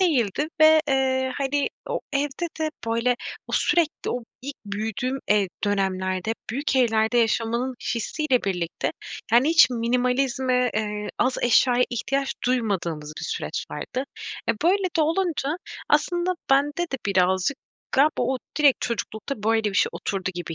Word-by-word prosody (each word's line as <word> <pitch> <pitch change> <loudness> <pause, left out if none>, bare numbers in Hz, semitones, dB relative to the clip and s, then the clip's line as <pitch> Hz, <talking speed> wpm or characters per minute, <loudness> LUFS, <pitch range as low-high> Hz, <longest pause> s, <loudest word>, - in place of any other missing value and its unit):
değildi 295 - +1
ve, 315 0 +8
eee, 260 -1 +1
hani, 280 +1 0 0.2
o - - -1
evde 285 +4 -1
de, 310 0 0 0.2
böyle, 230 +2 +1 0.3
o - - -9
sürekli 330 -2 +1
o 245 - -2 0.2
ilk 280 +1 -6
büyüdüğüm 220 +6 -2
ev 205 -1 +4 0.2
dönemlerde 190 -2 0
hep 225 - -2
büyük 270 +3 -1
evlerde 225 -1 +3
yaşamanın 235 +2 +1 0.2
hissiyle 255 +3 0
birlikte, 180 -4 -2 0.4
yani, 245 +5 +5
hiç 330 -4 +6
minimalizme, 250 +1 +1
eee, 210 -1 -2
az 255 0 +1
eşyaya 245 +1 +4
ihtiyaç 275 +3 -1
duymadığımız 185 -11 -1
bir - - -5
süreç - - -3
vardı. 260 +1 -4 0.4
E, - - +5
böyle 385 +3 +3
de - - +3
olunca 320 -2 0 0.3
aslında 350 +1 +2 0.2
bende 290 +4 +3
de - - 0
birazcık 190 +5 +2 0.4
galiba 295 +3 +3
o 260 0 0 0.2
direkt 290 -3 +5
çocuklukta 230 0 -4
böyle 225 +1 +2
bir 205 -2 -1
şey - - +3
oturdu 190 -2 -3
gibi 175 -1 -5
250 Hz, 145 wpm, -24 LUFS, 215-280 Hz, 0.4 s, ve